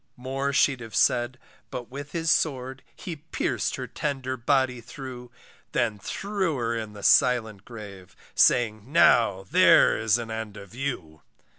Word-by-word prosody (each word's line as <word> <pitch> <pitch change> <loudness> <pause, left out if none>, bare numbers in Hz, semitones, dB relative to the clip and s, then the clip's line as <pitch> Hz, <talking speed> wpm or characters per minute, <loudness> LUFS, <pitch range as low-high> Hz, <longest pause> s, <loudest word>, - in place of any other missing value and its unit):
More 135 +2 -2
she'd 135 -1 +2
have 115 -2 -9
said, 120 +2 +2 0.3
but 125 0 -7
with 140 +2 -8
his 165 -1 0
sword, 135 -4 0
He 175 -5 -7
pierc'd - - -1
her - - -5
tender 135 -3 -3
body 130 -1 +1
through; 125 0 -9 0.4
Then 115 -4 0
threw 195 - -2
her 115 -1 -1
in 110 -2 -5
the 100 -1 -11
silent 110 -5 +3
grave, 100 -6 -11 0.2
Saying, 115 0 +2
now, 115 - +4
there - - +6
is 110 0 +2
an 115 -1 -6
end 110 -2 -5
of 100 0 -12
you. 115 - -5
125 Hz, 150 wpm, -26 LUFS, 110-135 Hz, 0.4 s, there